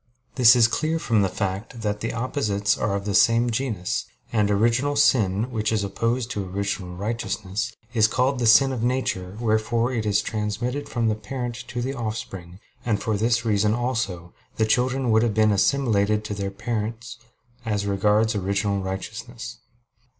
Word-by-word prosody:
This 125 Hz, -1 st, +7 dB
is 115 Hz, -2 st, +6 dB
clear 155 Hz, +7 st, -1 dB
from 115 Hz, -9 st, +1 dB
the 95 Hz, -, +1 dB
fact 100 Hz, +5 st, -4 dB
that 105 Hz, 0 st, -2 dB
opposites 110 Hz, -5 st, 0 dB
are 100 Hz, -1 st, -1 dB
of 100 Hz, 0 st, -4 dB
the 105 Hz, -, -1 dB
same 115 Hz, +3 st, +4 dB
genus; 110 Hz, -7 st, -2 dB, 0.3 s
and 105 Hz, -2 st, +2 dB
original 120 Hz, +7 st, +2 dB
sin, 115 Hz, -5 st, +2 dB
which 110 Hz, -2 st, -1 dB
is 110 Hz, -2 st, +1 dB
opposed 115 Hz, +4 st, -1 dB
to 105 Hz, -, -2 dB
original 95 Hz, -1 st, -3 dB
righteousness, 105 Hz, +1 st, -3 dB, 0.2 s
is 110 Hz, -3 st, +4 dB
called 130 Hz, +3 st, 0 dB
the 120 Hz, -, +1 dB
sin 115 Hz, +5 st, +6 dB
of 125 Hz, -4 st, -3 dB
nature, 110 Hz, -6 st, -1 dB
wherefore 115 Hz, +2 st, +1 dB
it 110 Hz, -3 st, -1 dB
is 100 Hz, -1 st, +2 dB
transmitted 115 Hz, +6 st, -3 dB
from 115 Hz, -2 st, 0 dB
the 110 Hz, -, +2 dB
parent 120 Hz, +3 st, -5 dB
to 120 Hz, -1 st, -4 dB
the 135 Hz, +2 st, -2 dB
offspring; 100 Hz, -7 st, -6 dB, 0.3 s
and 110 Hz, -4 st, 0 dB
for 110 Hz, -, -1 dB
this 115 Hz, +2 st, +1 dB
reason 105 Hz, 0 st, +2 dB
also, 110 Hz, -9 st, -3 dB, 0.2 s
the 110 Hz, -, +3 dB
children 125 Hz, +2 st, +1 dB
would 110 Hz, 0 st, +5 dB
have 115 Hz, -3 st, 0 dB
been 110 Hz, -1 st, +4 dB
assimilated 105 Hz, -2 st, +2 dB
to 105 Hz, -, -4 dB
their 100 Hz, -1 st, -3 dB
parents 115 Hz, +2 st, -4 dB, 0.4 s
as 105 Hz, -3 st, -1 dB
regards 105 Hz, +3 st, +2 dB
original 100 Hz, 0 st, -1 dB
righteousness. 110 Hz, +5 st, -6 dB
110 Hz, 165 wpm, -24 LUFS, 100-120 Hz, 0.4 s, This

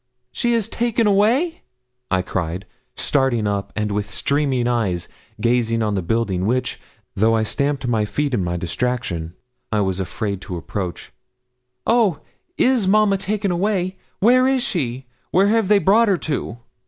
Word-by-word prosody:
'She 240 Hz, -1 st, +1 dB
is 225 Hz, -4 st, 0 dB
taken 235 Hz, -1 st, 0 dB
away!' 235 Hz, -, +2 dB, 0.5 s
I 95 Hz, -1 st, +1 dB
cried, 90 Hz, 0 st, -3 dB, 0.3 s
starting 135 Hz, -6 st, +1 dB
up, 100 Hz, -1 st, -2 dB
and 105 Hz, -1 st, -1 dB
with 105 Hz, 0 st, -1 dB
streaming 135 Hz, +2 st, 0 dB
eyes, 105 Hz, -8 st, 0 dB, 0.3 s
gazing 115 Hz, -1 st, +1 dB
on 105 Hz, -1 st, 0 dB
the 95 Hz, -, 0 dB
building 95 Hz, -1 st, 0 dB
which, 130 Hz, +3 st, -1 dB, 0.3 s
though 110 Hz, +3 st, +3 dB
I 110 Hz, -, +2 dB
stamped 140 Hz, +3 st, -1 dB
my 115 Hz, -3 st, +1 dB
feet 145 Hz, +5 st, -2 dB
in 100 Hz, -, +1 dB
my 90 Hz, 0 st, -2 dB
distraction, 85 Hz, -3 st, -2 dB, 0.4 s
I 105 Hz, -2 st, +2 dB
was 95 Hz, -1 st, -1 dB
afraid 100 Hz, +1 st, -3 dB
to 90 Hz, -4 st, -6 dB
approach. 90 Hz, +1 st, -5 dB, 0.7 s
'Oh, 215 Hz, -10 st, +2 dB, 0.4 s
is 250 Hz, -6 st, +3 dB
mamma 205 Hz, -1 st, +4 dB
taken 200 Hz, 0 st, -1 dB
away? 185 Hz, 0 st, -1 dB, 0.2 s
Where 255 Hz, +5 st, +5 dB
is 265 Hz, -2 st, +2 dB
she? 135 Hz, -, -2 dB, 0.2 s
Where 195 Hz, +2 st, +3 dB
have 225 Hz, -2 st, +2 dB
they 210 Hz, +1 st, +5 dB
brought 205 Hz, +4 st, +4 dB
her 195 Hz, -3 st, +3 dB
to?' 145 Hz, -7 st, -3 dB
130 Hz, 155 wpm, -21 LUFS, -, 0.7 s, Where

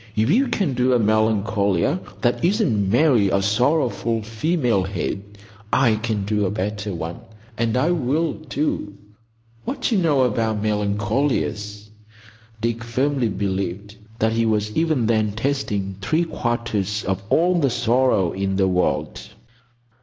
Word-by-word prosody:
If 110 Hz, +6 st, +2 dB
you 260 Hz, +8 st, +3 dB
can 190 Hz, -, 0 dB
do 125 Hz, +1 st, +2 dB
a 125 Hz, -, +3 dB
Melancolia 110 Hz, -, +1 dB, 0.2 s
that 120 Hz, +4 st, 0 dB
isn't 170 Hz, -, +2 dB
merely 120 Hz, -4 st, +4 dB
a 100 Hz, -, +2 dB
sorrowful 115 Hz, 0 st, +1 dB
female 115 Hz, -, 0 dB
head, 95 Hz, +1 st, -3 dB, 0.5 s
I 125 Hz, -4 st, +3 dB
can 110 Hz, -3 st, -2 dB
do 105 Hz, -1 st, 0 dB
a -, -, -1 dB
better 105 Hz, +1 st, -3 dB
one; 85 Hz, 0 st, -5 dB, 0.4 s
and 115 Hz, +1 st, 0 dB
I 155 Hz, +7 st, +2 dB
will, 160 Hz, +1 st, 0 dB, 0.2 s
too. 120 Hz, -7 st, -2 dB, 0.7 s
What -, -, -5 dB
d'you 220 Hz, -5 st, +2 dB
know 150 Hz, -7 st, +3 dB
about 110 Hz, -3 st, 0 dB
Melacolias?" 105 Hz, 0 st, -1 dB, 0.7 s
Dick 115 Hz, 0 st, -1 dB
firmly 130 Hz, +1 st, 0 dB
believed 100 Hz, 0 st, -3 dB, 0.2 s
that 110 Hz, 0 st, +1 dB
he 115 Hz, 0 st, +1 dB
was 105 Hz, -1 st, 0 dB
even 155 Hz, -7 st, +1 dB
then 110 Hz, -2 st, +1 dB
tasting 105 Hz, -6 st, -2 dB
three 155 Hz, +12 st, +1 dB
quarters 115 Hz, -, -2 dB
of 95 Hz, 0 st, -1 dB
all 175 Hz, +1 st, +3 dB
the 140 Hz, -4 st, +2 dB
sorrow 120 Hz, -6 st, +2 dB
in 95 Hz, 0 st, -2 dB
the 95 Hz, 0 st, +2 dB
world. 90 Hz, -1 st, 0 dB
110 Hz, 140 wpm, -22 LUFS, 100-130 Hz, 0.7 s, merely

